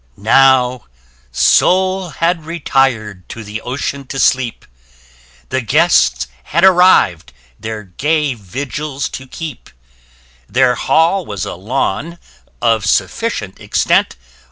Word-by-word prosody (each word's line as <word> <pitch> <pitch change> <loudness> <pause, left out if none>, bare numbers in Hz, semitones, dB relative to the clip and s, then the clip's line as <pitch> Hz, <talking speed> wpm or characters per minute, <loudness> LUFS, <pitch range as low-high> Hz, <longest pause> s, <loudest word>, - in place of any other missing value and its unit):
Now 125 +2 +3 0.5
Sol 185 - +2
had 165 +1 -1
retir'd 125 - -1
to 115 - -8
the 105 +1 -7
ocean 140 +1 -4
to 135 - -6
sleep: 130 -3 0 0.8
The 130 0 -1
Guests 65 - +2 0.2
had 170 +4 0
arriv'd 180 - +4 0.3
their 110 0 -6
gay 145 - -1
vigils 135 +7 -5
to 130 - -8
keep 155 -1 -8 0.8
Their 125 +3 +3
hall 165 +9 +1
was 100 - -5
a - - -5
lawn, 130 - -3 0.5
of 115 -3 +2
sufficient 105 - -1
extent. - - +1
130 Hz, 105 wpm, -16 LUFS, 110-160 Hz, 0.8 s, arriv'd